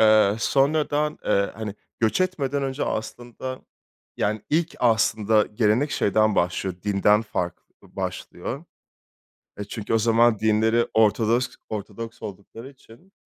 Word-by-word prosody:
Eee, 110 -2 +5
sonradan, 150 +3 +1
eee, 100 -1 +2
hani 105 -1 -5 0.3
göç 110 +8 +2
etmeden 145 -7 0
önce 135 +1 -2
aslında 120 +3 -5 0.6
yani 105 0 -1
ilk 165 +2 +1
aslında 110 -2 +3
gelenek 110 +6 +1
şeyden 110 -2 +2
başlıyor, 90 +1 0
dinden 105 +1 +3
farklı 90 -5 -4 0.3
başlıyor. 130 - -5 0.9
E, 105 - -4
çünkü 105 +1 -4
o - - +4
zaman 115 0 +4
dinleri 110 +2 +2
Ortodosk 110 +3 +2 0.2
Ortodoks 110 +2 -7
oldukları 105 +5 -9
için, 135 +7 -19
110 Hz, 120 wpm, -24 LUFS, 105-130 Hz, 0.9 s, Eee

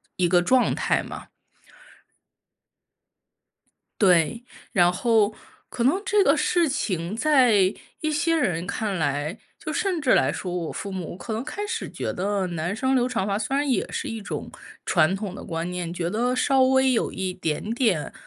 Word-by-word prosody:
一 180 -1 +1
个 175 0 +4
状 250 +8 +3
态 - - 0
嘛。 - - -9 2.7
对， 185 +4 +3 0.3
然 175 -1 +4
后 215 +1 +2 0.4
可 235 - -2
能 340 +10 +3
这 410 -1 +3
个 - - +4
事 345 -2 +2
情 195 - -2
在 235 -9 +4 0.3
一 310 0 0
些 330 +2 +1
人 180 - 0
看 205 -3 -2
来 145 +4 -1 0.2
就 310 - -5
甚 375 -2 -1
至 260 -3 +3
来 - - +3
说 180 -2 -5
我 170 -3 -3
父 200 - -6
母 180 -3 -5
可 220 - -8
能 225 +3 -2
开 410 +8 -5
始 455 +2 -4
觉 - - -4
得 195 0 -1
男 175 +2 -3
生 260 +4 0
留 250 -1 +3
长 230 -6 -1
发 200 +1 -1
虽 245 +5 -2
然 285 0 0
也 255 - 0
是 - - -3
一 225 -1 -5
种 - - -6 0.3
传 180 +5 +3
统 195 -2 -5
的 - - -8
观 165 +1 -4
念， 175 -1 -4
觉 175 -1 -2
得 245 +5 0
稍 265 +1 +3
微 265 0 +4
有 235 - 0
一 185 -1 -3
点 185 +4 -3
点 220 - 0
210 Hz, 190 characters per minute, -24 LUFS, 180-260 Hz, 2.7 s, 个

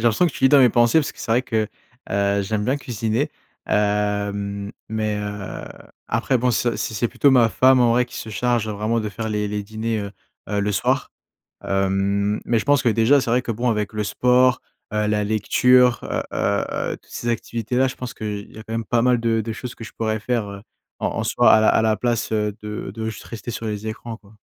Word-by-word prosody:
j'ai - - -6
l'impression 120 +9 +3
que 165 - -2
tu - - -9
lis 130 - +8
dans 145 - +6
mes 130 -2 +7
pensées 120 +5 +4
parce 145 - -1
que - - -23
c'est - - -5
vrai 120 +3 +3
que, 110 -4 -1 0.4
heu, 100 0 +1
j'aime 105 +1 -2
bien 130 +5 +1
cuisiner. 120 +2 -2 0.4
Hem, 100 -1 -1 0.2
mais, 110 -1 -1
heu, 105 -1 -6 0.4
après 125 +3 +1
bon, 125 +1 +2
ça 120 0 0
c'est - - -3
c'est 110 +3 +1
plutôt 140 +4 +3
ma 120 -4 +5
femme 130 +6 +4
en 120 -2 +4
vrai 125 +1 +3
qui 125 - -11
se 110 - -6
charge 120 0 0
vraiment 110 +2 -1
de 110 - -2
faire 110 +3 -5
les 105 -1 -1
les 105 0 -3
dîners, 110 +1 -3
heu, 100 -1 -5 0.4
heu, 105 - -1
le 105 +1 0
soir. 100 - 0 0.5
Hem, 100 +1 0
mais 115 -2 +1
je - - -6
pense 145 -1 +4
que - - +4
déjà, 115 +5 +4
c'est 120 - -4
vrai 125 +2 +2
que, 125 - -4
bon, 120 +2 0
avec 105 -1 -1
le 105 -1 -2
sport, 125 +4 +3 0.3
heu, 105 0 0
la 105 -1 +1
lecture, 125 +4 +4
heu - - -2
heu - - 0 0.3
heu - - -4
toutes - - -25
ces - - -6
activités-là, 120 +2 0
je 130 - -7
pense 125 -1 -6
qu'il 105 -1 -6
y - - -15
a 110 - -8
quand 110 - -9
même 115 0 -2
pas 115 +2 +1
mal 125 0 +3
de 115 -1 +1
de 110 +1 -4
choses 120 +2 -7
que - - -12
je 110 - -8
pourrais 110 -1 -2
faire, 115 -2 -1
heu, 100 0 -8 0.4
en - - 0
en - - -3
soi - - +4
à 110 - +6
la 110 - +4
à - - +3
la 110 -1 +2
place 120 -1 -1
de 105 -1 0
de 105 +1 -5
juste 110 - -6
rester 115 +1 -7
sur 115 -1 -5
les 105 0 -4
écrans, 115 0 -6
quoi. 105 -1 -21
110 Hz, 240 wpm, -22 LUFS, 105-120 Hz, 0.5 s, lis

